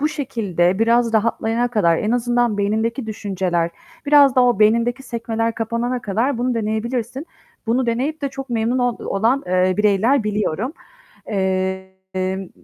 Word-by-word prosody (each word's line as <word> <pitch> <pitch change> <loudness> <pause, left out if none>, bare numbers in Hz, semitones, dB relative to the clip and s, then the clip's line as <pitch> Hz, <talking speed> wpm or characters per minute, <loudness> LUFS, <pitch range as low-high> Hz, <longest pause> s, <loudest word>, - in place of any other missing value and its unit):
bu 300 - +2
şekilde, 205 - -1
biraz 230 +1 +3
rahatlayana 225 +2 +1
kadar, 185 -8 +2
en 215 - -1
azından 240 -2 +1
beynindeki 220 +4 -1
düşünceler, 185 -5 -2 0.4
biraz 285 -2 +6
da 255 - +5
o 245 -5 +2
beynindeki 235 +4 +2
sekmeler 230 -2 -2
kapanana 235 +2 -2
kadar 230 +6 -1
bunu 250 +1 0
deneyebilirsin. 235 +5 -3 0.4
Bunu 245 +3 +1
deneyip 270 +7 -2
de 280 - 0
çok 270 -1 -8
memnun 235 +2 0
ol 245 -2 0
olan, 230 +8 +1
eee, 185 +1 +2
bireyler 210 +5 +2
biliyorum. 210 - -1 0.5
Emm, 190 -1 -3
225 Hz, 140 wpm, -20 LUFS, 200-245 Hz, 0.5 s, biraz